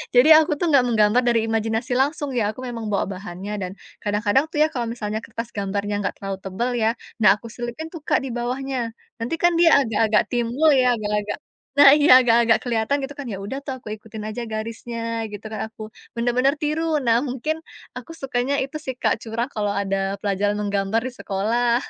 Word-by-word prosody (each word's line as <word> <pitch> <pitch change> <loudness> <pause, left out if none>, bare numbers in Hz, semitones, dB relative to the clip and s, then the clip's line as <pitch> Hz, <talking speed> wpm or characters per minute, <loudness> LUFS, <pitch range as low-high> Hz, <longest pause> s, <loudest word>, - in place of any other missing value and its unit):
Jadi 250 +5 +7
aku 320 +1 +1
tuh 330 +2 0
enggak 270 -3 +5
menggambar 215 0 +4
dari 235 -2 +3
imajinasi 225 +2 -1
langsung, 290 +1 0
ya, 245 -3 0
aku 255 - -8
memang 235 -3 -5
bawa 200 - +1
bahannya, 190 +1 -7
dan 185 -2 -4 0.3
kadang-kadang 210 +7 +1
tuh, - - -10
ya, - - +4
kalau 240 -5 -3
misalnya 220 -2 -3
kertas 230 +1 -7
gambarnya 200 +1 -2
enggak 200 - -2
terlalu 195 -1 -4
tebal, 195 +6 -2
ya, 220 0 +3 0.3
nah, 205 -3 +6
aku 220 +3 -11
selipin 240 +7 -6
tuh 330 - -7
Kak - - +2
di 265 - -4
bawahnya. 255 +3 -3 0.4
Nanti 230 +8 -2
kan 345 - +6
dia 340 -1 +7
agak-agak 220 -2 +2
timbul, 245 +6 +2
ya, 250 -1 +4
agak-agak 210 -1 -2 0.4
nah, 285 -1 +10
iya, 300 0 +4
agak-agak 235 -2 +4
kelihatan 235 +3 0
gitu 275 +1 -6
kan. 285 - -3
Ya, 195 - -4
udah 205 +7 -5
tuh, 275 -2 -4
aku 235 - -15
ikutin 215 0 -10
aja 215 +3 -4
garisnya 230 +2 -5 0.3
gitu 205 +1 -9
kan, 215 - -4
aku 225 - -14 0.3
benar-benar 245 +4 +2
tiru. 305 +2 0 0.2
Nah, 230 -1 +4
mungkin 265 +5 -2 0.4
aku 330 - -9
sukanya 265 0 -1
itu 270 +3 -8
sih 260 - -3
Kak, 220 - +2
curang 230 +2 -2
kalau 205 -1 0
ada 195 -1 -1 0.3
pelajaran 205 +1 0
menggambar 200 +1 0
di 255 - -6
sekolah. 235 +4 +1
230 Hz, 195 wpm, -22 LUFS, 210-260 Hz, 0.4 s, nah